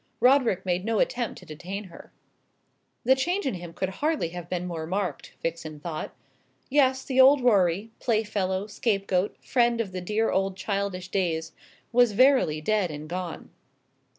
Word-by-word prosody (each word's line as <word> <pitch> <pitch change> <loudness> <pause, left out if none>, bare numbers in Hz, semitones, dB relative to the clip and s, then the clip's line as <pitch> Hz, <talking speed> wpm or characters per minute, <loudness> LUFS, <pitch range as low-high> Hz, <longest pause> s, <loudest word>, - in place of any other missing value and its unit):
Roderick 250 -8 +3
made 180 0 0
no 225 +1 0
attempt 240 +2 0
to - - -13
detain 180 +6 -6
her. 185 -4 -13 0.9
The 260 - +5
change 350 +9 -1
in 265 - 0
him 175 -2 -7
could 185 +2 -2
hardly 305 - +1
have 175 0 -8
been 180 -1 -2
more 165 -3 -4
marked, 185 -4 -3
Vixen 160 -2 -4
thought. 160 0 -5 0.6
Yes, 265 -2 +3
the 265 -1 +3
old 275 +1 +7
Rorie 200 -3 +2
playfellow, 205 -5 0
scapegoat, 195 -3 -1
friend 240 -2 +2
of 215 -5 -2
the 185 0 -5
dear 215 +5 0
old 195 0 0
childish 195 -2 -3
days 170 -4 -1 0.4
was 240 -2 +4
verily 255 - +4
dead 205 +1 +1
and 150 0 -7
gone. 175 -1 -5
195 Hz, 155 wpm, -26 LUFS, 175-235 Hz, 0.9 s, old